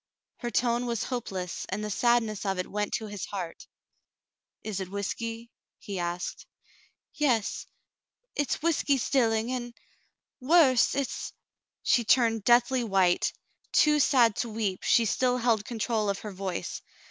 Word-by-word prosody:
" - - -62
Her 240 - -2
tone 240 0 +1
was 235 -2 -1
hopeless, 190 -8 -4
and 200 +3 -3
the 210 - -4
sadness 225 -2 +1
of 195 -2 -1
it 180 - -1
went 210 0 -2
to 220 - -2
his 205 -2 -5
heart. 180 -5 -6 1.0
"Is 210 -3 -3
it 190 -1 -5
whiskey 230 +4 -4
?" - - -64
he 200 -4 -6
asked. 175 +1 -4 0.7
"Yes 245 -8 0 0.3
— - - -56
it's 290 +1 -1
whiskey 300 -4 +2
'stilling 230 -3 +1
and 240 -2 -4 0.4
— - - -58 0.2
worse; 265 -4 +4
it's 280 -1 -3
— - - -63
" - - -65
She 240 - +3
turned 225 -2 +3
deathly 245 +2 +4
w^hite. 190 -5 +2 0.4
Too 300 -1 +5
sad 240 -6 +4
to 240 - -2
weep, 210 -4 -2
she 230 - +3
still 250 +3 +1
held 230 -4 +1
control 220 -2 -1
of 200 - 0
her 210 - -6
voice. 190 -2 -4
230 Hz, 160 wpm, -28 LUFS, 200-245 Hz, 1.0 s, Too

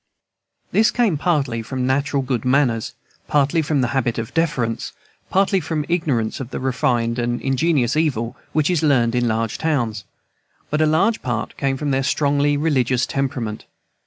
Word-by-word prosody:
This 220 +2 +4
came 230 -8 +1
partly 140 -7 0
from 125 +3 -3
natural 140 +1 0
good 125 -3 -2
manners, 125 -4 +1 0.3
partly 145 +2 +2
from 150 -2 0
the 125 - 0
habit 120 -3 0
of 115 -1 -4
deference, 130 -9 -1 0.4
partly 195 0 +2
from 155 -2 -3
ignorance 145 -10 0
of 130 -3 -6
the - - -5
refined 120 -2 0
and 120 0 -1
ingenious 135 -1 +1
evil 135 -8 0 0.2
which 155 +2 +1
is 170 -3 +1
learned 125 -7 +3
in 120 -1 +1
large 115 0 -1
towns; 120 -10 -1 0.7
but 150 +1 +1
a 155 - +4
large 190 +9 +2
part 120 -3 -3
came 135 -1 -1
from 145 0 -2
their 135 0 +1
strongly 145 +1 +1
religious 130 -5 +1
temperament. 130 -6 -3
135 Hz, 160 wpm, -21 LUFS, 120-155 Hz, 0.7 s, This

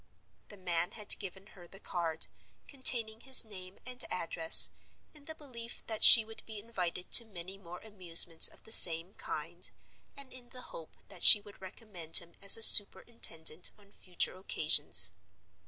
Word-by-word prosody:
The 205 - -17
man 175 -2 -7
had 210 -2 0
given 195 -1 -13
her 175 -3 -20
the 195 - -16
card, 165 -5 -7 0.4
containing 235 -5 -1
his 265 -2 +1
name 185 -3 -13
and 250 0 -2
address, 165 -2 +3 0.4
in 300 -2 -22
the 315 - -14
belief 240 -6 -14
that 220 -2 -8
she 225 -3 +6
would 225 0 -13
be 220 -1 -12
invited 185 -5 -9
to 235 - +7
many 190 -3 -15
more 175 -2 -16
amusements 175 -5 +1
of - - -12
the 220 - -15
same 170 -2 +5
kind, - - -8 0.5
and 275 -2 -12
in 250 -1 -15
the 255 - -12
hope - - -17
that - - -12
she 210 - +5
would 205 -1 -22
recommend 185 -4 -6
him 170 -1 -8
as 200 +2 +6
a 225 - 0
superintendent 180 -7 +2
on 200 -1 -24
future 180 -3 -8
occasions. 190 - -2
200 Hz, 165 wpm, -26 LUFS, 175-230 Hz, 0.5 s, to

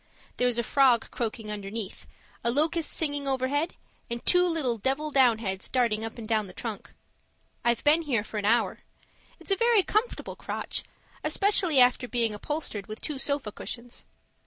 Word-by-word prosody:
There's 245 -1 +2
a 235 - +1
frog 255 -1 +3
croaking 220 -2 -3
underneath, 205 0 -5 0.4
a 235 - +2
locust 315 +5 +1
singing 290 -3 -1
overhead 270 +4 0 0.3
and 235 0 -4
two 360 0 +5
little 275 -9 0
'devil 275 +7 -1
downheads' 225 -7 +2
darting 230 -4 +1
up 225 +1 -6
and 225 -2 -7
down 215 -2 +1
the 185 - -12
trunk. 215 +1 -7 0.7
I've 235 -1 +1
been 305 +3 +5
here 255 -9 0
for 215 0 -5
an 205 - -3
hour; 230 +2 +2 0.6
it's - - -9
a - - +6
very 465 -2 +4
comfortable 430 +6 -1
crotch, - - -4 0.4
especially 385 -7 +3
after 250 0 +4
being 235 -3 0
upholstered 210 -3 -4
with 215 - -7
two 295 -3 -4
sofa 280 -6 -2
cushions. 240 +3 -8
245 Hz, 160 wpm, -27 LUFS, 225-295 Hz, 0.7 s, a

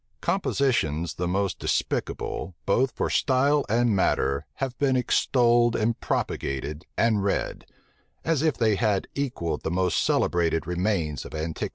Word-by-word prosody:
Compositions 120 - 0
the 90 - -3
most 95 +1 -1
despicable, 90 - -2
both 125 +7 +2
for - - -2
style 140 +2 +2
and 115 0 +2
matter, 70 -5 +1
have 130 -2 -3
been 135 -2 +2
extolled, 120 -1 +3
and 115 +1 0
propagated, 75 +4 -3
and 110 -3 +2
read; 100 - -2 0.6
as 160 -4 +1
if 155 -6 +1
they 110 -3 +2
had 105 -3 +1
equalled 85 - -2
the - - -2
most 90 +1 +1
celebrated 85 -2 +1
remains 90 - -1
of - - -9
antiquity. 80 +1 -3
105 Hz, 140 wpm, -26 LUFS, 85-125 Hz, 0.6 s, extolled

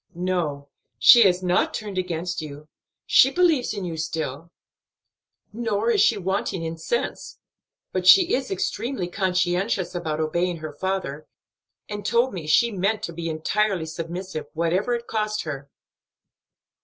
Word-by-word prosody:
"No, 170 -6 -2 0.3
she 240 - +8
has 180 0 0
not 180 0 +1
turned 205 -3 -4
against 175 -1 -3
you, 150 0 -9 0.4
she 265 - +6
believes 325 -5 +2
in 200 -3 -4
you 165 -2 -5
still; 160 -1 -4 1.0
nor 225 0 0
is - - +3
she 230 - +4
wanting 190 -2 -2
in 165 0 -4
sense; 235 - -3 0.5
but 185 -1 -2
she 370 - +7
is 260 0 0
extremely 205 +2 -2
conscientious 185 +1 0
about 160 -3 -3
obeying 170 +3 0
her 155 -1 -7
father, 170 -3 -3 0.6
and 205 -1 -6
told 235 +5 +1
me 170 -5 -6
she 235 +10 +4
meant 200 +2 -1
to 170 - -4
be 165 0 -4
entirely 180 +3 0
submissive, 165 +1 -6
whatever 175 +9 0
it 235 0 -6
cost 215 -1 -2
her." 140 -3 -6
180 Hz, 145 wpm, -24 LUFS, 160-210 Hz, 1.0 s, she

